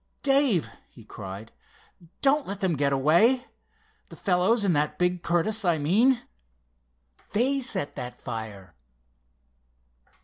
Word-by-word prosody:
"Dave," 270 Hz, -, +3 dB, 0.2 s
he 115 Hz, -, -16 dB
cried, 100 Hz, +1 st, -9 dB, 0.7 s
"don't 280 Hz, +1 st, +2 dB
let 200 Hz, 0 st, -5 dB
them 185 Hz, -5 st, 0 dB
get 140 Hz, 0 st, +1 dB
away—the 170 Hz, -, 0 dB
fellows 200 Hz, +4 st, +1 dB
in 185 Hz, -, +3 dB
that 150 Hz, 0 st, 0 dB
big 180 Hz, 0 st, 0 dB
Curtiss, 175 Hz, +7 st, 0 dB
I 175 Hz, -3 st, +2 dB
mean. 220 Hz, -, +2 dB, 1.1 s
They 265 Hz, +6 st, +2 dB
set 245 Hz, -, -2 dB
that 125 Hz, 0 st, -6 dB
fire!" 105 Hz, -5 st, -7 dB
180 Hz, 110 wpm, -26 LUFS, 140-235 Hz, 1.1 s, Dave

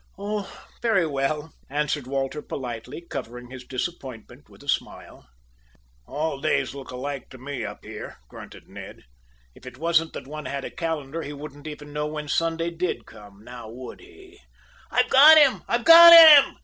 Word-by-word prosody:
"Oh, 205 Hz, 0 st, -7 dB
very 220 Hz, -7 st, +1 dB
well," 150 Hz, +1 st, -3 dB, 0.2 s
answered 145 Hz, -1 st, -3 dB
Walter 135 Hz, +2 st, -3 dB
politely, 125 Hz, +1 st, -8 dB
covering 125 Hz, -6 st, -9 dB
his 130 Hz, -1 st, -10 dB
disappointment 130 Hz, -3 st, -8 dB
with -, -, -18 dB
a -, -, -17 dB
smile. -, -, -5 dB, 0.8 s
"All 150 Hz, -2 st, -4 dB
days 130 Hz, -2 st, -1 dB
look 140 Hz, -1 st, -10 dB
alike 135 Hz, +1 st, -7 dB
to 130 Hz, -, -13 dB
me 130 Hz, -1 st, -7 dB
up -, -, -9 dB
here," -, -, -9 dB
grunted -, -, -13 dB
Ned. -, -, -12 dB, 0.5 s
"If 130 Hz, -, -16 dB
it 130 Hz, -, -11 dB
wasn't 165 Hz, 0 st, 0 dB
that -, -, -8 dB
one 150 Hz, +2 st, -9 dB
had 140 Hz, -1 st, -5 dB
a -, -, -7 dB
calendar 165 Hz, -3 st, -5 dB
he 145 Hz, -1 st, -7 dB
wouldn't 145 Hz, 0 st, -11 dB
even 150 Hz, -1 st, -10 dB
know 150 Hz, 0 st, -3 dB
when 150 Hz, -1 st, -7 dB
Sunday 165 Hz, +2 st, -1 dB
did 170 Hz, -8 st, -4 dB
come. 100 Hz, 0 st, -16 dB
Now, 120 Hz, -1 st, -11 dB
would 125 Hz, +3 st, -10 dB
he 385 Hz, 0 st, -18 dB, 0.3 s
" -, -, -29 dB
"I've -, -, +2 dB
got 300 Hz, +4 st, +8 dB
him! 290 Hz, -4 st, +4 dB
I've 235 Hz, 0 st, -2 dB
got 340 Hz, +1 st, +10 dB
him!" 310 Hz, -4 st, +9 dB
150 Hz, 175 wpm, -23 LUFS, 130-170 Hz, 0.8 s, got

